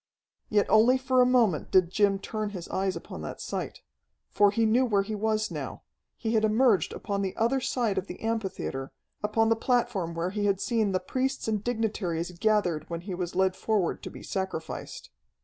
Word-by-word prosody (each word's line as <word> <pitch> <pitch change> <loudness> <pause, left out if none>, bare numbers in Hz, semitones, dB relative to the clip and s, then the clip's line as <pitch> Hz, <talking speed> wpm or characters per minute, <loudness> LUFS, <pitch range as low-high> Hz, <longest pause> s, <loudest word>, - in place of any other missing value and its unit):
Yet 205 -1 +3
only 225 +5 +5
for 260 -1 +2
a 250 - +5
moment 230 - +2
did 185 -2 +4
Jim 200 -1 +3
turn 215 +2 -4
his 170 - -7
eyes 190 0 -1
upon - - -8
that - - -6
sight. - - -5 0.5
For 205 0 +5
he 225 +3 +1
knew 230 +4 +4
where 205 -5 +2
he 215 +2 -5
was 215 +1 0
now. - - -6 0.3
He 225 -1 -2
had 220 -1 +3
emerged 220 -4 +3
upon 200 -1 -3
the 190 -1 -3
other 250 +4 +2
side 235 -5 0
of 190 - -8
the - - -8
amphitheatre, 195 -12 -3 0.3
upon 220 +2 +2
the 225 - +4
platform 225 -8 0
where 170 +2 -1
he 205 0 -1
had 195 -2 +2
seen 220 -3 +1
the 185 - +1
priests 265 +3 -2
and 215 -2 -1
dignitaries 205 -8 -1
gathered 180 -8 +1
when 170 -1 -4
he 185 +1 -6
was 180 -1 -4
led 190 0 +2
forward 210 -5 0
to - - -6
be - - -11
sacrificed. 190 -4 -5
210 Hz, 195 wpm, -28 LUFS, 190-225 Hz, 0.5 s, only